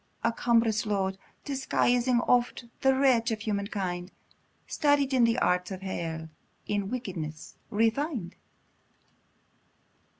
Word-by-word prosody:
a 230 0 +2
cumbrous 230 -2 +2
load, 195 -2 0 0.3
Disguising 250 -3 +2
oft 240 0 +1 0.2
the 265 0 +4
wretch 255 -4 +3
of 220 -1 -2
human 200 -2 -1
kind, 180 -3 -3 0.6
Studied 285 -2 +2
in 235 -2 +4
arts 180 -4 +1
of 190 -1 -7
hell, 165 -4 -4 0.4
in 205 -1 -1
wickedness 180 -11 -5
refin'd! 225 - 0
225 Hz, 105 wpm, -28 LUFS, 190-245 Hz, 0.6 s, the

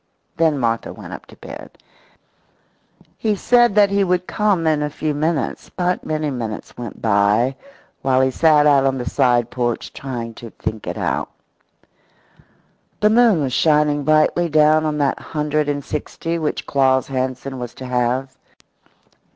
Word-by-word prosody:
Then 160 -2 +2
Martha 115 -3 -1
went - - -10
up - - -10
to - - -15
bed. - - -11 1.4
He 215 -2 +1
said 240 +1 +3
that 205 -1 +5
he 200 0 +2
would 180 -1 0
come 205 -6 0
in 155 -2 +2
a 150 - -1
few 150 +1 -3
minutes, 155 0 -2
but 180 0 -1
many 155 -1 -2
minutes 115 -4 -6
went 120 -2 -8
by 110 +4 +2 0.5
while 130 -1 +2
he 130 0 +2
sat 150 +1 +4
out 140 -2 +4
on 135 0 0
the 125 -1 -5
side 120 -1 +2
porch 120 -2 -2
trying 120 -4 -6
to 115 +1 -10
think 110 0 -6
it - - -4
out. - - -2 1.7
The 210 0 +3
moon 225 -8 +4
was 130 -2 -2
shining 150 -1 +2
brightly 155 +3 +2
down 155 +1 +4
on 150 -1 -1
that 140 -2 0
hundred 150 -1 -2
and 145 -1 -3
sixty 165 +2 -4
which 155 -2 -2
Claus 130 -1 +2
Hansen 130 0 -3
was 120 -1 -7
to 130 - -8
have. 125 +1 -1
145 Hz, 160 wpm, -20 LUFS, 130-160 Hz, 1.7 s, that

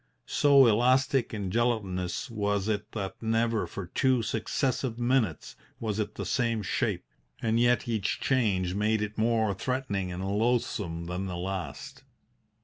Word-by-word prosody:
So 140 -2 +5
elastic 125 +3 +3
and 100 -4 -3
gelatinous 100 -4 -1
was 105 -2 -1
it 105 -1 -2
that 100 -3 -5
never 115 -1 +1
for 100 - -6
two 125 +6 +1
successive 120 +2 -1
minutes 120 - 0 0.2
was 110 -2 -2
it 105 - -2
the - - -4
same 115 -4 0
shape, - - -1 0.3
and 115 0 +1
yet 120 0 +3
each 110 -3 -1
change 100 -9 +1
made 105 +2 +1
it 105 0 -5
more 110 -2 +2
threatening 100 -5 -2
and 90 +2 -4
loathsome 105 -5 0
than 90 +3 -3
the 90 -1 -4
last. 90 -6 -5
110 Hz, 145 wpm, -28 LUFS, 95-120 Hz, 0.3 s, So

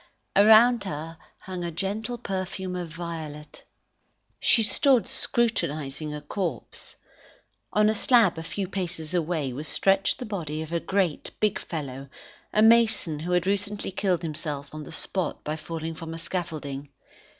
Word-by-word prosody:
Around 220 +2 +7
her 165 0 -5 0.2
hung 185 -2 -5
a 170 - -2
gentle 205 +8 -3
perfume 190 -3 -4
of 175 -2 -4
violet. 160 -3 -7 0.8
She 230 - +5
stood 260 +2 +4
scrutinising 155 - 0
a 150 0 -5
corpse. 155 - -4 0.8
On 210 0 +4
a 215 - +4
slab 220 -6 +4
a - - -4
few 190 +3 -3
paces 175 -4 -4
away, 160 -6 0
was 150 +5 -4
stretched 195 +3 +3
the 250 - -5
body 160 -8 -3
of 160 +1 -8
a 170 - +2
great, 190 -4 0
big 210 -2 +2
fellow, 140 -4 -6 0.4
a 215 - +4
mason 225 -9 +4
who 175 +3 -2
had 180 0 +2
recently 200 +1 -1
killed 185 -2 0
himself 150 -3 -4
on 155 -1 -6
the - - -10
spot 190 -2 -1
by 150 - -2
falling 160 +1 -5
from 165 0 -7
a - - -6
scaffolding. 155 -5 -4
175 Hz, 150 wpm, -26 LUFS, 155-200 Hz, 0.8 s, Around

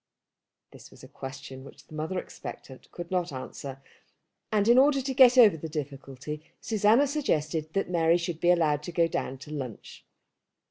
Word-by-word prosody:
This - - -14
was - - -17
a - - -10
question 130 0 -9
which 140 - -14
the - - -17
mother 155 +4 -3
expectant 130 -6 -9
could 175 0 -8
not 180 -2 0
answer, 135 0 -8 0.7
and 210 -1 +2
in 240 +2 +7
order 275 +1 +4
to 265 0 -3
get 255 -1 +7
over 220 -8 +8
the 160 +1 -7
difficulty 145 0 -6 0.2
Susanna 220 +5 +3
suggested 160 - -1
that 195 - 0
Mary 170 -1 +3
should 170 -2 -4
be 175 - +2
allowed 155 -4 +3
to 165 - -7
go 170 -1 +2
down 135 -4 -3
to 145 +3 -11
lunch. 130 -7 -7
165 Hz, 175 wpm, -28 LUFS, 145-205 Hz, 0.7 s, over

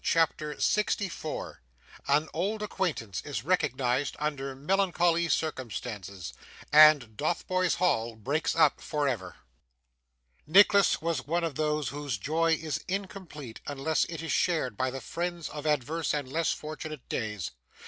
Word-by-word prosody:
CHAPTER 155 -2 +1
64 200 -6 -1 0.5
An 150 +3 +3
old 205 +6 -1
Acquaintance 150 - -2
is 145 - -4
recognised 140 -6 +1
under 140 -3 -2
melancholy 170 +2 +2
Circumstances, 105 - -3 0.4
and 150 -7 +7
Dotheboys 180 - 0
Hall 115 -10 +1
breaks 140 +9 -1
up 165 - +4
for 150 -2 -1
ever 95 -9 -3 1.1
Nicholas 200 +1 +5
was 160 -6 -1
one 170 +3 0
of 165 -3 -1
those 150 0 0
whose 145 -5 -3
joy 165 +9 +1
is 160 -1 -2
incomplete 185 - -6
unless 145 +2 0
it 165 -1 -6
is 165 - -3
shared 155 - +1
by 130 +4 0
the 135 +1 -6
friends 170 +5 -4
of 150 0 -5
adverse 150 +2 0
and 145 -3 -3
less 160 +5 0
fortunate 155 -2 -6
days. 105 -6 -3
150 Hz, 130 wpm, -29 LUFS, 130-170 Hz, 1.1 s, and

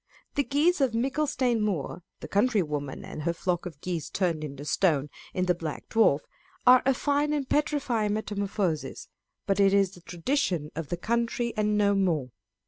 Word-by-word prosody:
The 285 - +1
geese 300 +4 +2
of 260 -4 +2
Micklestane 255 -2 +1
Muir 185 -5 -2 0.2
(the - - -6
country 210 -1 +2
woman 145 -3 -4
and - - -7
her 170 +2 0
flock 175 0 -2
of 155 -5 -10
geese 175 -4 -3
turned 170 -5 -1
into 140 -1 -6
stone) 150 -2 +1 0.2
in 185 - 0
the 180 - +3
Black 165 -3 -6
Dwarf, 220 -11 +4 0.4
are 250 0 +8
a 270 - +5
fine 290 +2 +1
and 285 -3 -1
petrifying 260 -9 +1
metamorphosis; 200 -6 -2 0.4
but 195 -1 +1
it 200 0 +5
is 195 -2 +3
the 175 - -14
tradition 175 - -1
of 160 -2 -5
the 175 - -2
country 235 +3 -1
and 210 0 +1
no 200 -1 +3
more. 165 -10 +1
200 Hz, 175 wpm, -27 LUFS, 170-245 Hz, 0.4 s, are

